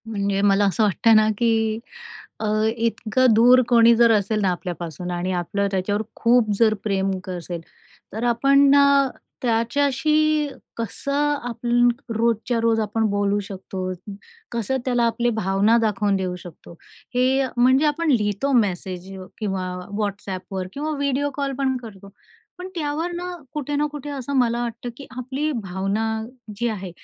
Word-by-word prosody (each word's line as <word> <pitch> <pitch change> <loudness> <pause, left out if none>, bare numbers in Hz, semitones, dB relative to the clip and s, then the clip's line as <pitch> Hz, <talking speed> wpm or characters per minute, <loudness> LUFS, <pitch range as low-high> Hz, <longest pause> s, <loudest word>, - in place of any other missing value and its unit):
म्हणजे 200 -2 -1
मला 205 0 +4
असं 200 +3 +1
वाटतं 215 +3 +4
ना 215 0 +5
की 225 -1 +1 0.6
अ, 220 - -3 0.3
इतकं 230 +1 +2
दूर 245 +3 +6
कोणी 235 -1 +6
जर 235 0 +5
असेल 215 0 +1
ना 195 - +2
आपल्यापासून 175 -1 -5
आणि 175 +1 -2
आपलं 200 +3 -1
त्याच्यावर 205 +2 0
खूप 235 -1 +3
जर 225 -2 +5
प्रेम 195 -2 0
असेल, 175 -2 -5 0.5
तर 220 +3 -4
आपण 275 +4 +4
अ, 280 -1 +5 0.3
त्याच्याशी 285 +6 +1 0.3
कसं 230 +5 -4 0.4
आपण 240 +1 +2 0.3
रोजच्या 230 +1 0
रोज 230 -1 +2
आपण 220 +1 0
बोलू 205 0 +1
शकतो, 185 -1 -5 0.6
कसं 235 +2 -1
त्याला 245 -2 +1
आपली 235 +1 0
भावना 210 0 +2
दाखवून 205 -2 +1
देऊ 185 -2 -2
शकतो 170 -1 -12 0.4
हे 260 +2 +3
म्हणजे 260 +4 +4
आपण 305 +1 +1
लिहितो 215 +3 0
मेसेज 185 -2 -3 0.3
किंवा 190 -4 -2 0.3
WhatsAppवर 195 -2 -4
किंवा 300 +2 -3
व्हिडिओ 280 0 0
कॉल 280 -1 -2
पण 265 -1 +1
करतो. 200 -3 -11 0.5
पण 360 +1 -7
त्यावर 320 +2 -2
ना 355 +1 -5 0.2
कुठे 290 -1 -3
ना 295 +1 +1
कुठे 295 -1 -7
असं 280 -1 -5
मला 240 -1 +1
वाटतं 235 +1 -5
की 280 - -10
आपली 265 +5 -2
भावना 195 +4 -2 0.5
जी 240 +2 0
आहे 195 -4 -5
230 Hz, 145 wpm, -22 LUFS, 200-265 Hz, 0.6 s, दूर